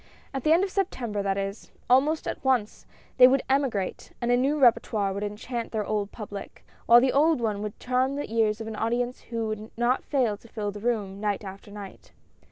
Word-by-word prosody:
At 270 Hz, -2 st, -3 dB
the 305 Hz, -, +3 dB
end 340 Hz, +4 st, +5 dB
of 390 Hz, -, -2 dB
Septem 345 Hz, -, -2 dB
ber, 205 Hz, -1 st, -1 dB
that 195 Hz, 0 st, -1 dB
is, 195 Hz, +1 st, -4 dB, 0.2 s
almost 285 Hz, +5 st, +3 dB
at -, -, -4 dB
once 250 Hz, -6 st, 0 dB
— -, -, -31 dB
they 250 Hz, -1 st, +10 dB
would 265 Hz, +1 st, +2 dB
emigrate, 265 Hz, -8 st, -1 dB
and 240 Hz, 0 st, 0 dB
a -, -, +5 dB
new 275 Hz, +4 st, +1 dB
rSpertoire 220 Hz, -5 st, +3 dB
would 200 Hz, -, -4 dB
enchant 225 Hz, +3 st, -4 dB
their 215 Hz, -2 st, -2 dB
old 210 Hz, -1 st, -2 dB
public, 205 Hz, -2 st, -8 dB, 0.2 s
while 235 Hz, +1 st, +9 dB
the 255 Hz, +1 st, +2 dB
old 310 Hz, +1 st, +4 dB
one 215 Hz, -3 st, -1 dB
would 210 Hz, -1 st, -6 dB
charm 255 Hz, +2 st, 0 dB
the 285 Hz, -5 st, -5 dB
ears 220 Hz, -1 st, +2 dB
of 225 Hz, -, -5 dB
an 220 Hz, 0 st, -5 dB
audience 240 Hz, +3 st, -1 dB
who 230 Hz, -1 st, -4 dB
would 215 Hz, 0 st, -5 dB
not 240 Hz, +2 st, +1 dB
fail 245 Hz, -8 st, 0 dB
to 230 Hz, -, -18 dB
fill 210 Hz, -2 st, -4 dB
the 205 Hz, -, -8 dB
room, 205 Hz, -4 st, -2 dB
night 205 Hz, -1 st, -1 dB
after 195 Hz, +1 st, -9 dB
night. 205 Hz, -1 st, -11 dB
230 Hz, 220 wpm, -26 LUFS, 205-255 Hz, 0.2 s, they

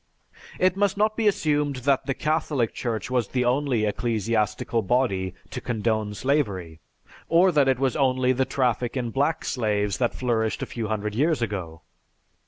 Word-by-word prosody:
It 185 Hz, 0 st, +3 dB
must 200 Hz, -1 st, +1 dB
not 215 Hz, +1 st, +2 dB
be 225 Hz, -2 st, +1 dB
assumed 150 Hz, -7 st, +1 dB
that 140 Hz, -1 st, +2 dB
the 135 Hz, -, 0 dB
Catholic 150 Hz, -6 st, 0 dB
Church 115 Hz, 0 st, -3 dB
was 125 Hz, -4 st, +1 dB
the 125 Hz, +2 st, -1 dB
only 125 Hz, -3 st, +1 dB
ecclesiastical 110 Hz, 0 st, 0 dB
body 95 Hz, -5 st, 0 dB, 0.2 s
to -, -, -5 dB
condone 110 Hz, -2 st, -1 dB
slavery, 100 Hz, -, -1 dB, 0.5 s
or 175 Hz, +3 st, +5 dB
that 145 Hz, -4 st, +3 dB
it 130 Hz, -2 st, +3 dB
was 135 Hz, -1 st, 0 dB
only 130 Hz, -2 st, +2 dB
the 130 Hz, +1 st, +2 dB
traffic 125 Hz, -1 st, 0 dB
in 120 Hz, -2 st, -2 dB
black 145 Hz, +5 st, 0 dB
slaves 105 Hz, -5 st, -1 dB
that 120 Hz, -2 st, 0 dB
flourished 115 Hz, -3 st, -1 dB
a -, -, -2 dB
few 115 Hz, -2 st, -4 dB
hundred 105 Hz, -1 st, -2 dB
years 145 Hz, +2 st, +1 dB
ago. 90 Hz, -7 st, -5 dB
125 Hz, 165 wpm, -25 LUFS, 110-140 Hz, 0.5 s, or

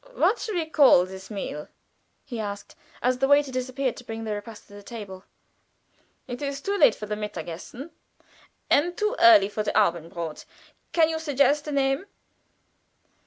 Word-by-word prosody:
"What 475 Hz, -, +2 dB
shall 430 Hz, -, -4 dB
we 335 Hz, -2 st, 0 dB
call 285 Hz, -, +5 dB
this 190 Hz, 0 st, -10 dB
meal?" 195 Hz, -8 st, -5 dB, 0.6 s
he 240 Hz, -5 st, -6 dB
asked, 205 Hz, -1 st, -6 dB, 0.3 s
as 250 Hz, +1 st, +1 dB
the 270 Hz, -, +2 dB
waiter 285 Hz, -1 st, +4 dB
disappeared 255 Hz, 0 st, -2 dB
to -, -, -10 dB
bring 225 Hz, -1 st, -6 dB
the 215 Hz, -1 st, -3 dB
repast 210 Hz, +1 st, -8 dB
to -, -, -18 dB
the 205 Hz, -, -10 dB
table. 200 Hz, -3 st, -9 dB, 1.0 s
"It 245 Hz, 0 st, -6 dB
is 280 Hz, -1 st, -3 dB
too 395 Hz, +8 st, -2 dB
late 475 Hz, +4 st, +5 dB
for 210 Hz, -, -7 dB
the 210 Hz, -, -4 dB
Mittagessen, 210 Hz, -, -7 dB, 0.8 s
and 345 Hz, +5 st, +2 dB
too 425 Hz, +3 st, 0 dB
early 215 Hz, -4 st, +7 dB
for 210 Hz, +1 st, -3 dB
the 210 Hz, -, -2 dB
Abendbrod. 170 Hz, -4 st, -2 dB, 0.5 s
Can 325 Hz, -2 st, +4 dB
you 320 Hz, 0 st, -2 dB
suggest 290 Hz, -1 st, +2 dB
a -, -, -3 dB
name?" 275 Hz, +5 st, 0 dB
245 Hz, 165 wpm, -25 LUFS, 205-285 Hz, 1.0 s, early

